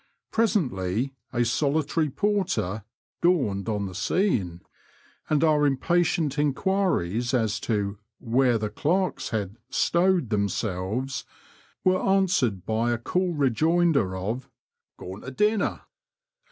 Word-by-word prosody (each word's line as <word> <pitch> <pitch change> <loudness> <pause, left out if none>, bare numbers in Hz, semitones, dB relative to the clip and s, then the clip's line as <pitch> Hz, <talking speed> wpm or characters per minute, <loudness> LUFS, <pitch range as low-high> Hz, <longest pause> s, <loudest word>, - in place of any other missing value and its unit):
Presently 135 - 0 0.2
a 120 -2 +1
solitary 150 +5 +1
porter 170 - -1 0.4
dawned 130 - +1
on 105 -2 -1
the 95 - -6
scene," 95 - 0 0.7
and 155 0 +2
our 155 -2 +4
impatient 155 +1 +1
enquiries 140 - +1
as 110 -3 0
to 100 -2 -2 0.2
where 125 0 +2
the 105 -1 -3
clerks 185 +5 0
had 105 -2 -3
'stowed* 175 - +2
themselves 105 +5 -1 0.6
were 185 0 +3
answered 180 - +1
by 110 +2 0
a 120 - +1
cool 180 +9 -1
rejoinder 145 - +2
of 110 +8 -4 0.5
Gone 95 +3 -8
to 130 - -7
•dinner.' 210 +9 +1
130 Hz, 110 wpm, -26 LUFS, 105-170 Hz, 0.7 s, our